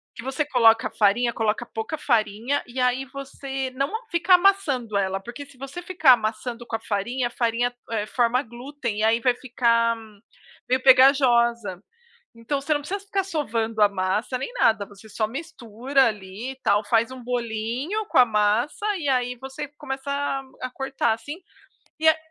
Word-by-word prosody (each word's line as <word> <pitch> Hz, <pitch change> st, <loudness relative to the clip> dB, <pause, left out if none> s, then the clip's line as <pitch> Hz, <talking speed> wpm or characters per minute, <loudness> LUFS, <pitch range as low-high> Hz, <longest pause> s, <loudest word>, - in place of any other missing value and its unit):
que 230 Hz, -, -8 dB
você 265 Hz, +3 st, -2 dB
coloca 225 Hz, -5 st, +4 dB
a -, -, -11 dB
farinha, 230 Hz, +3 st, +2 dB
coloca 225 Hz, +1 st, -1 dB
pouca 225 Hz, +9 st, -5 dB
farinha, 235 Hz, 0 st, 0 dB
e 245 Hz, +1 st, -7 dB
aí 250 Hz, +1 st, +1 dB
você 270 Hz, -1 st, -5 dB
não 275 Hz, +3 st, -2 dB, 0.2 s
fica 345 Hz, +1 st, +4 dB
amassando 310 Hz, -, +2 dB
ela, 195 Hz, -1 st, 0 dB
porque 240 Hz, +8 st, -9 dB
se 275 Hz, -2 st, -19 dB
você 275 Hz, +6 st, -7 dB
ficar 340 Hz, -8 st, +5 dB
amassando 235 Hz, +1 st, -3 dB
com 225 Hz, -, -3 dB
a -, -, -21 dB
farinha, 240 Hz, +5 st, -2 dB
a -, -, -8 dB
farinha, 240 Hz, +1 st, -1 dB, 0.2 s
eh, 210 Hz, -2 st, -1 dB
forma 245 Hz, +2 st, +1 dB
glúten 240 Hz, -2 st, -6 dB
e -, -, 0 dB
aí 225 Hz, +1 st, +3 dB
vai 245 Hz, 0 st, +2 dB
ficar 230 Hz, -2 st, +1 dB, 0.7 s
meio 255 Hz, 0 st, +2 dB
pegajosa. 240 Hz, -7 st, +4 dB, 0.5 s
Então 230 Hz, +5 st, -3 dB
você 295 Hz, +3 st, -2 dB
não 290 Hz, -, +2 dB
precisa 380 Hz, +8 st, -4 dB
ficar 395 Hz, -1 st, -2 dB
sovando 230 Hz, -, -1 dB
a 205 Hz, -, +7 dB
massa 200 Hz, +6 st, -1 dB
nem 475 Hz, -, -5 dB
nada. 220 Hz, -, +2 dB
Você 205 Hz, +2 st, -16 dB
só 215 Hz, 0 st, -1 dB
mistura 265 Hz, -2 st, -1 dB
ali 210 Hz, +4 st, -4 dB
e -, -, -14 dB
tal, 205 Hz, +1 st, +2 dB
faz 225 Hz, +3 st, +2 dB
um 260 Hz, -1 st, -9 dB
bolinho 245 Hz, -, -2 dB
com -, -, +1 dB
a 250 Hz, -, +9 dB
massa 225 Hz, -, 0 dB
e 290 Hz, -4 st, -3 dB
aí 250 Hz, -1 st, 0 dB
você 270 Hz, +3 st, -6 dB
começa 270 Hz, +1 st, -6 dB
a 280 Hz, -1 st, -1 dB, 0.2 s
a 255 Hz, -, -3 dB
cortar, 270 Hz, -3 st, -1 dB
assim, 285 Hz, +9 st, -6 dB, 0.6 s
e 320 Hz, -, +2 dB
a 315 Hz, -, +3 dB
245 Hz, 180 wpm, -24 LUFS, 225-275 Hz, 0.7 s, a